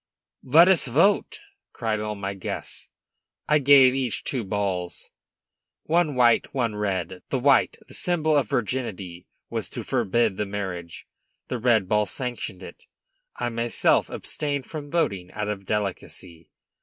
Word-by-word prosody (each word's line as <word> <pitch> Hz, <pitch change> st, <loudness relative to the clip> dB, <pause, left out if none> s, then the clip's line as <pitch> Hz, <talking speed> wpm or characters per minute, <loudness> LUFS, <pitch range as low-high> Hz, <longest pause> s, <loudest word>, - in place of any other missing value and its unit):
"Let 160 Hz, +7 st, +6 dB
us 185 Hz, -6 st, +4 dB
vote!" 195 Hz, -, +2 dB, 0.3 s
cried 110 Hz, -3 st, -2 dB
all 105 Hz, 0 st, -3 dB
my 100 Hz, 0 st, -4 dB
guests. 95 Hz, -, -5 dB, 0.6 s
I 150 Hz, 0 st, +4 dB
have 140 Hz, -, -10 dB
each 130 Hz, -3 st, +5 dB
two 125 Hz, -4 st, -1 dB
balls, 95 Hz, -3 st, -3 dB, 0.7 s
one 160 Hz, -3 st, +1 dB
white, 120 Hz, 0 st, +3 dB
one 115 Hz, -5 st, 0 dB
red. 95 Hz, -3 st, -2 dB
The 135 Hz, -, 0 dB
white, 135 Hz, +2 st, +3 dB
symbol 160 Hz, -3 st, 0 dB
of 140 Hz, -3 st, +2 dB
virginity, 100 Hz, -8 st, -3 dB, 0.2 s
was -, -, -3 dB
to -, -, -6 dB
forbid 110 Hz, 0 st, +1 dB
the 105 Hz, -, -2 dB
marriage; 95 Hz, -4 st, -5 dB, 0.4 s
the 125 Hz, -, -2 dB
red 110 Hz, -5 st, +3 dB
ball 105 Hz, +1 st, +2 dB
sanctioned 120 Hz, -6 st, -5 dB
it. -, -, -12 dB, 0.5 s
I 120 Hz, -, -2 dB
myself 115 Hz, 0 st, +1 dB
abstained 145 Hz, -3 st, -3 dB
from 150 Hz, -2 st, -7 dB
voting, 100 Hz, -, -1 dB
out 105 Hz, 0 st, -3 dB
of 100 Hz, -2 st, -5 dB
delicacy. 95 Hz, -5 st, -4 dB
115 Hz, 140 wpm, -25 LUFS, 100-135 Hz, 0.7 s, Let